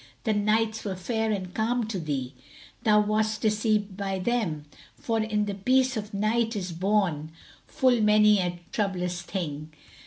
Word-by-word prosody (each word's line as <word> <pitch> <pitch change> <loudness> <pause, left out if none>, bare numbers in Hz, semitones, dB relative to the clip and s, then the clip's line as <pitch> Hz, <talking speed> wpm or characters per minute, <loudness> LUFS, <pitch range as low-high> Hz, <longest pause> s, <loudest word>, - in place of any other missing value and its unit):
The 220 - +1
nights 220 +1 +1
were 195 -3 -3
fair 220 +4 -1
and 185 -4 -3
calm 230 +2 0
to 200 -4 -2
thee; 140 -5 -3 0.5
thou 210 -1 +4
wast 215 0 0
deceived 210 -2 +1
by 195 -1 -2
them, 185 -8 -1 0.3
For 225 -1 -1
in 215 -1 0
the 205 - -3
peace 255 +6 +2
of 210 -1 -4
night 220 +3 0
is 185 -3 -3
born 175 -4 0 0.4
full 250 -3 +2
many 210 -1 +5
a 175 -1 -2
troublous 180 -4 -1
thing." 155 -6 -5
210 Hz, 155 wpm, -27 LUFS, 185-220 Hz, 0.5 s, many